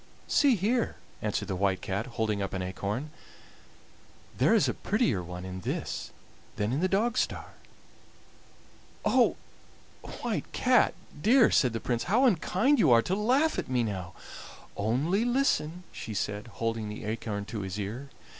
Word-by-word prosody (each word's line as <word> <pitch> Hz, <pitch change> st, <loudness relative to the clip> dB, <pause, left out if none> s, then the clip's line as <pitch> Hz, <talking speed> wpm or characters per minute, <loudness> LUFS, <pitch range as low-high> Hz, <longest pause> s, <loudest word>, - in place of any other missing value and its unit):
"See 280 Hz, -5 st, +4 dB
here," 225 Hz, +5 st, 0 dB, 0.3 s
answered 105 Hz, -1 st, -2 dB
the 95 Hz, -, -2 dB
White 95 Hz, 0 st, +1 dB
Cat, 100 Hz, +6 st, -2 dB
holding 110 Hz, -2 st, 0 dB
up 95 Hz, -, -3 dB
an 95 Hz, -1 st, -2 dB
acorn; 100 Hz, +10 st, -4 dB, 1.2 s
"there -, -, +4 dB
is -, -, +4 dB
a -, -, 0 dB
prettier 90 Hz, -, 0 dB
one 90 Hz, +1 st, -7 dB
in 95 Hz, 0 st, -6 dB
this -, -, -3 dB, 0.5 s
than 105 Hz, +3 st, -1 dB
in 140 Hz, -, 0 dB
the 185 Hz, +2 st, +1 dB
Dogstar!" 215 Hz, +4 st, 0 dB, 1.5 s
"Oh! -, -, +4 dB, 0.9 s
White -, -, -2 dB
Cat 250 Hz, 0 st, +3 dB, 0.3 s
dear," 235 Hz, -, +5 dB
said 125 Hz, -, +4 dB
the 115 Hz, -, -2 dB
Prince, 120 Hz, -1 st, -2 dB
"how 230 Hz, -, +3 dB
unkind 235 Hz, -, +3 dB
you 155 Hz, -, +5 dB
are 115 Hz, -1 st, +6 dB
to 185 Hz, -, -2 dB
laugh 255 Hz, +10 st, +2 dB
at -, -, -5 dB
me 125 Hz, -2 st, +1 dB
now!" 95 Hz, -6 st, -4 dB, 0.6 s
"Only 140 Hz, -, +1 dB
listen," 240 Hz, -, +1 dB
she 110 Hz, -, -7 dB
said, 105 Hz, +2 st, -3 dB
holding 115 Hz, -2 st, -3 dB
the 105 Hz, 0 st, -7 dB
acorn 105 Hz, -2 st, -3 dB
to 105 Hz, -1 st, -5 dB
his 95 Hz, +1 st, -4 dB
ear. 115 Hz, +8 st, -5 dB
115 Hz, 155 wpm, -29 LUFS, -, 1.5 s, are